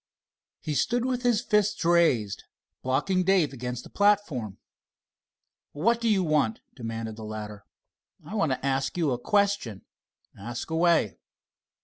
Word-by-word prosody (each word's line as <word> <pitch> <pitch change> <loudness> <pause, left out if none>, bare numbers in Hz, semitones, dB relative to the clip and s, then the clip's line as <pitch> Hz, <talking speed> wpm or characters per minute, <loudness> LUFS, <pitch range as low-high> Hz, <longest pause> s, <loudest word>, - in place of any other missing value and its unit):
He 155 - -3
stood 240 - +1
with 255 -1 -1
his 240 -2 +2
fists 210 -5 +1
raised, 130 - +2 0.4
blocking 185 +9 +1
Dave 185 -5 +3
in - - -15
against 125 -1 -5
the - - -13
platform. 195 - +1 1.2
"What 230 +10 +1
do 230 - +1
you 195 -3 +3
want?" 150 -9 +1 0.2
demanded 115 -2 -5
the 110 - -8
latter. 105 -1 -7 0.6
"I - - -9
want 165 -10 +1
to 130 +1 -2
ask 135 +3 -1
you 160 -5 +1
a 120 - -1
question." 200 - 0 0.5
"Ask 120 +8 -6
away." 160 - +2
150 Hz, 140 wpm, -27 LUFS, -, 1.2 s, Dave